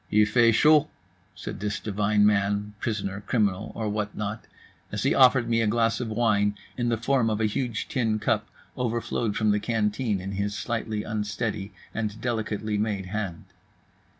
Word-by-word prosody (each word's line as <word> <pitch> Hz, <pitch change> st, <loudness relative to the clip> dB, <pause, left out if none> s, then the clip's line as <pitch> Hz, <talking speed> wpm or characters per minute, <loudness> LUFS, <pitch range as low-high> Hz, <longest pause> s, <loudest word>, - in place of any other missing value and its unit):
"Il 105 Hz, 0 st, +5 dB
fait 115 Hz, +2 st, +4 dB
chaud," 150 Hz, +4 st, +5 dB, 0.5 s
said -, -, -6 dB
this 105 Hz, +1 st, -2 dB
divine 105 Hz, 0 st, +2 dB
man, 105 Hz, 0 st, +1 dB
prisoner, 100 Hz, -3 st, -3 dB
criminal, 100 Hz, -4 st, 0 dB
or 110 Hz, -2 st, -2 dB
what 105 Hz, 0 st, -3 dB
not, 105 Hz, +1 st, -4 dB, 0.5 s
as -, -, -2 dB
he -, -, +3 dB
offered 130 Hz, -2 st, +5 dB
me 115 Hz, 0 st, +2 dB
a 110 Hz, -, +2 dB
glass 115 Hz, +1 st, +2 dB
of 120 Hz, -3 st, -3 dB
wine 105 Hz, -2 st, +2 dB, 0.2 s
in 120 Hz, -1 st, 0 dB
the 115 Hz, -, +1 dB
form 120 Hz, 0 st, +2 dB
of 110 Hz, -1 st, -1 dB
a 110 Hz, -, +2 dB
huge 110 Hz, 0 st, -2 dB
tin 115 Hz, -5 st, 0 dB
cup -, -, 0 dB, 0.3 s
overflowed 115 Hz, -2 st, -1 dB
from 110 Hz, -1 st, +3 dB
the 105 Hz, -, +2 dB
canteen 105 Hz, 0 st, 0 dB
in 95 Hz, +1 st, -5 dB
his 100 Hz, +1 st, -2 dB
slightly 110 Hz, -3 st, -2 dB
unsteady 105 Hz, -1 st, -3 dB, 0.2 s
and 110 Hz, -1 st, -3 dB
delicately 110 Hz, -3 st, -2 dB
made 105 Hz, -3 st, -1 dB
hand. 100 Hz, -6 st, -3 dB
105 Hz, 170 wpm, -26 LUFS, 105-115 Hz, 0.5 s, Il